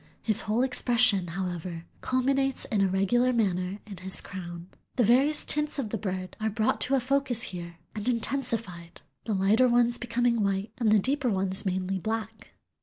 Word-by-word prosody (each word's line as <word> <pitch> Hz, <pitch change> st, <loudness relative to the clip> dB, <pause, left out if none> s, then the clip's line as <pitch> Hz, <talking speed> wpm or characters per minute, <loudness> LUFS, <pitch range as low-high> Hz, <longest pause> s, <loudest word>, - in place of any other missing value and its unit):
His 220 Hz, -1 st, +2 dB
whole 220 Hz, +4 st, 0 dB
expression, 240 Hz, -7 st, +3 dB
however, 175 Hz, -1 st, -5 dB, 0.2 s
culminates 270 Hz, +1 st, 0 dB
in 210 Hz, -3 st, 0 dB
a 195 Hz, -, +4 dB
regular 195 Hz, +7 st, +2 dB
manner 190 Hz, -5 st, 0 dB
in 205 Hz, -3 st, -9 dB
his 190 Hz, +2 st, -1 dB
crown. 175 Hz, -2 st, -7 dB, 0.3 s
The 250 Hz, -, +3 dB
various 265 Hz, +7 st, +3 dB
tints 300 Hz, 0 st, -1 dB
of 235 Hz, -7 st, -3 dB
the 225 Hz, -, -1 dB
bird 185 Hz, -2 st, -4 dB
are 220 Hz, 0 st, 0 dB
brought 220 Hz, +1 st, 0 dB
to 270 Hz, +2 st, +2 dB
a -, -, +3 dB
focus 255 Hz, -2 st, +1 dB
here 170 Hz, -2 st, -7 dB, 0.2 s
and 215 Hz, +3 st, -2 dB
intensified, 230 Hz, -8 st, -2 dB, 0.2 s
the 220 Hz, -, -1 dB
lighter 210 Hz, +6 st, +4 dB
ones 240 Hz, 0 st, +3 dB
becoming 240 Hz, -1 st, +1 dB
white 200 Hz, +1 st, -1 dB
and 225 Hz, -3 st, +2 dB
the 215 Hz, -, +6 dB
deeper 265 Hz, +5 st, 0 dB
ones 190 Hz, -1 st, -1 dB
mainly 190 Hz, +1 st, -1 dB
black. 220 Hz, +1 st, -5 dB
215 Hz, 175 wpm, -28 LUFS, 190-245 Hz, 0.3 s, the